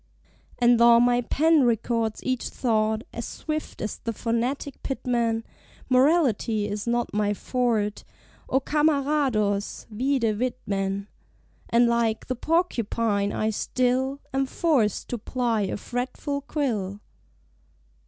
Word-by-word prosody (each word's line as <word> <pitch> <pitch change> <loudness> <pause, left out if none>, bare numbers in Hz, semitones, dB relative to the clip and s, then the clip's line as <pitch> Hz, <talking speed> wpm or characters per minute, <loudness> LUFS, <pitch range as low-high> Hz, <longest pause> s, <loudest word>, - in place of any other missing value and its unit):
And 240 -1 +4
tho' 235 0 +7
my 245 0 +3
pen 310 +4 +3
records 230 -1 0
each 255 -1 -1
thought 220 -2 0
As 235 - -4
swift 310 +2 -5
as 215 - -3
the 230 - -3
phonetic 240 +5 -2
Pitman, 235 -4 -1 0.5
Morality 255 - +3
is 205 +2 -4
not 240 0 0
my 210 0 +1
"forte," 225 -4 -1 0.5
O 265 - +3
Camarados! 275 -9 +1
(vide 230 -2 0
Whitman) 200 -5 -2 0.6
And, 235 +1 +4
like 235 -2 +1
the 255 - -2
Porcupine, 230 - 0
I 215 0 0
still 255 +5 0
Am 270 0 +1
forced 260 - +1
to 245 - -3
ply 235 -1 -1
a - - -3
fretful 255 +5 -3
quill. 210 -10 -2
235 Hz, 115 wpm, -25 LUFS, 215-265 Hz, 0.6 s, tho